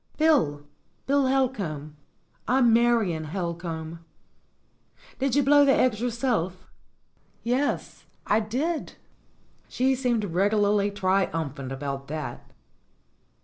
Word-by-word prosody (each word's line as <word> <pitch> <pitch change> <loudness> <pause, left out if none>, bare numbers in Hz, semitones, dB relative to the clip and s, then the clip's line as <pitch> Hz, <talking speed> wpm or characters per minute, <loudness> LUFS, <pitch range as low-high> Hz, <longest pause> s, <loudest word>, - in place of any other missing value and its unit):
"Bill 250 - +2 0.4
Bill 280 0 +2
Helcomb. 200 - -1 0.5
I'm 245 -1 +4
Marion 225 -9 +2
Helcomb." 165 -1 -5 1.2
"Did 270 -1 0
you 285 - +4
blow 290 +2 +6
the 275 -1 +4
eggs 230 -4 +2
yourself?" 230 -7 -1 0.8
"Yes, 255 +5 -1 0.2
I 210 - +3
did." 270 +10 -2 0.8
She 260 +2 +1
seemed 245 -4 0
regularly 205 +2 +2
triumphant 165 -9 -1
about 135 0 -5
that. 150 -5 -6
210 Hz, 95 wpm, -26 LUFS, 165-255 Hz, 1.2 s, blow